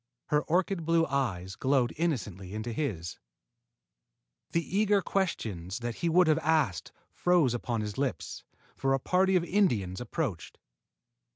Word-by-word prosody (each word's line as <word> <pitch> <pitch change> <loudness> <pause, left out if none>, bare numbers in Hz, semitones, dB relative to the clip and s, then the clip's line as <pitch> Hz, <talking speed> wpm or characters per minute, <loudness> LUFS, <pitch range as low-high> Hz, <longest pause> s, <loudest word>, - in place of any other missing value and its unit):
Her 150 0 +3
orchid 175 +2 0
blue 165 0 +3
eyes 95 - -2
glowed 130 -3 +1
innocently 105 - -2
into 110 +2 -3
his. 95 - -3 1.3
The 170 +2 -2
eager 205 -1 +4
questions 110 - -2
that 120 -1 -4
he 170 - 0
would 180 +2 +5
have 155 -1 +3
asked 150 - +1 0.2
froze 175 -8 +3
upon 120 -1 -2
his 105 +3 -4
lips, 140 -2 -3 0.3
for 135 0 +1
a - - -1
party 185 +6 +2
of 180 - +3
Indians 120 - +1
approached. 115 - -4
135 Hz, 135 wpm, -29 LUFS, 105-170 Hz, 1.3 s, would